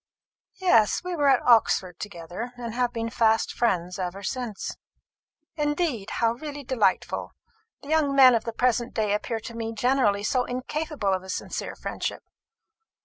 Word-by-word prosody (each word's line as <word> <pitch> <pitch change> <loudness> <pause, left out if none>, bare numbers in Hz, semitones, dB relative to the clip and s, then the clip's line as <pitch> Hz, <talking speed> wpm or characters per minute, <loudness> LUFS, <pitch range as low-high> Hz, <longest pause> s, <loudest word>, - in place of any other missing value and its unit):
"Yes; 235 - +3
we 360 0 -3
were 290 -3 +2
at 265 -2 +4
Oxford 195 -6 +3
together, 200 +5 -6
and 235 -2 -5
have 245 0 0
been 230 -1 -3
fast 225 -1 +2
friends 180 -5 0
ever 185 +2 -4
since." 240 -3 -4 0.8
"Indeed! 295 - -1
how 230 -1 +2
really 290 +3 -7
delightful! 235 -7 0 0.5
The 280 - -10
young 305 -3 +2
men 260 -2 +8
of 230 - +1
the 230 - -3
present 240 +1 0
day 215 -2 +1
appear 225 +2 -2
to 230 - -8
me 225 0 -4
generally 225 -3 +2
so 250 +3 +1
incapable 255 -3 -2
of 185 - -1
a 190 - -12
sincere - - -4
friendship. - - -4
235 Hz, 155 wpm, -26 LUFS, 210-265 Hz, 0.8 s, men